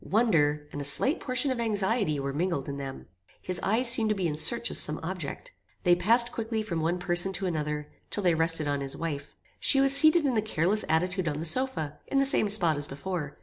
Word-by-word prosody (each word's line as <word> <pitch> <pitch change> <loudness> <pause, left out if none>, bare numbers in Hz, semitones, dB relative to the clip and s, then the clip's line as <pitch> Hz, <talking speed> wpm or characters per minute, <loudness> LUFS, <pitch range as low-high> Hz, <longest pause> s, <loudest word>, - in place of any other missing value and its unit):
Wonder, 150 -10 0
and 145 - -6
a - - -4
slight 145 - +2
portion 255 +1 0
of 255 - -4
anxiety 205 - -1
were 140 0 -4
mingled 165 -2 -3
in 140 -1 -6
them. 135 -1 -8 0.3
His 180 -1 -2
eyes 225 +6 0
seemed 230 -2 +4
to 215 - 0
be 185 -3 -2
in 150 - -3
search 235 +9 +2
of - - -1
some 150 +1 0
object. 170 -4 -7 0.3
They 175 -2 +4
passed 235 +6 +3
quickly 225 -1 -4
from 170 -6 -4
one 170 +3 -1
person 175 +1 +3
to 190 +1 -2
another, 150 -3 -4 0.2
till 205 - -3
they 175 -2 +2
rested 165 -1 0
on 145 -1 -2
his 135 -1 -5
wife. 145 -4 -6 0.2
She 275 - +2
was 275 0 +7
seated 310 +2 +5
in 260 -3 0
a 215 - +1
careless 205 0 +1
attitude 180 +3 -1
on 150 -1 -3
the 160 - -5
sofa, 160 - -2
in 275 - -2
the 275 - +3
same 215 -6 +4
spot 175 -7 +3
as 145 0 -3
before. 150 +1 -6
180 Hz, 230 wpm, -27 LUFS, 150-225 Hz, 0.3 s, was